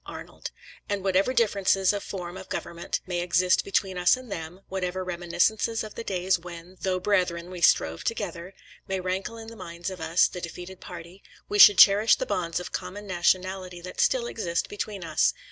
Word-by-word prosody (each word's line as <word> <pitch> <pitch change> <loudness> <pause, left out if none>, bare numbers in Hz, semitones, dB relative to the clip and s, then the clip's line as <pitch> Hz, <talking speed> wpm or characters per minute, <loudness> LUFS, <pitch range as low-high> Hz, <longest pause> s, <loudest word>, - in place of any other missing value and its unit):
[Arnold.] - - -8 0.4
and 200 -2 -2
whatever 195 +4 +2
differences 200 -5 +2
of 205 - -3
form 180 -3 -6
of 190 0 -10
government 170 0 -4
may 180 -1 -2
exist 180 +1 +2
between 190 -2 -1
us 180 +7 +4
and 255 -4 -11
them; 165 +2 -6
whatever 185 -1 -3
reminiscences 180 +6 0
of 215 - -8
the 230 - -6
days 185 -2 0
when, 170 +1 -10
though 185 -1 0
brethren, 180 -3 0
we 180 -1 -7
strove 80 - +3
together, 185 -4 -4 0.3
may 190 0 -2
rankle 185 +5 -3
in 225 0 -9
the 230 - -11
minds 170 -2 -6
of 185 -3 -8
us, 160 +2 +3
the 180 - -8
defeated 175 +2 -8
party; 175 +2 -10 0.3
we 205 - -1
should 205 -1 +10
cherish 205 +3 +7
the - - -3
bonds 170 - -2
of 180 - -7
common 205 +2 -6
nationality 185 0 0
that 180 +1 -4
still 250 -2 +2
exist 175 -8 -2
between 205 -2 -5
us. 165 - +2
185 Hz, 185 wpm, -26 LUFS, 175-200 Hz, 0.4 s, should